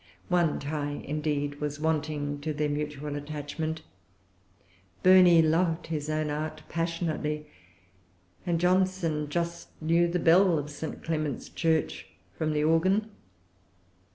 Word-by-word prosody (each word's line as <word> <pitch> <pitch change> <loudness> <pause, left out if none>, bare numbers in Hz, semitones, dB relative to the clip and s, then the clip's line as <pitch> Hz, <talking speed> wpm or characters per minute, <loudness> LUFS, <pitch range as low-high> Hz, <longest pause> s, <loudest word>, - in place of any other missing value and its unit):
One 175 -4 +2
tie, 145 0 -3
indeed, 145 -1 -2
was 145 0 -3
wanting 150 -2 -1
to 155 +1 -2
their 150 0 0
mutual 150 0 -3
attachment. 150 +2 -4 1.2
Burney 180 -3 +7
loved 165 +1 +1
his 155 -2 -3
own 155 -1 -1
art 155 +1 -4
passionately; 165 -3 -2 1.0
and 170 -2 0
Johnson 180 -4 +1
just 170 +2 -4
knew 165 +2 +3
the 175 +1 0
bell 175 +1 +5
of 150 0 -4
St. 155 +2 -6
Clement's 155 -5 -2
church 160 -2 0 0.3
from 155 +6 -1
the 150 0 +1
organ. 185 +7 +2
155 Hz, 120 wpm, -28 LUFS, 150-170 Hz, 1.2 s, Burney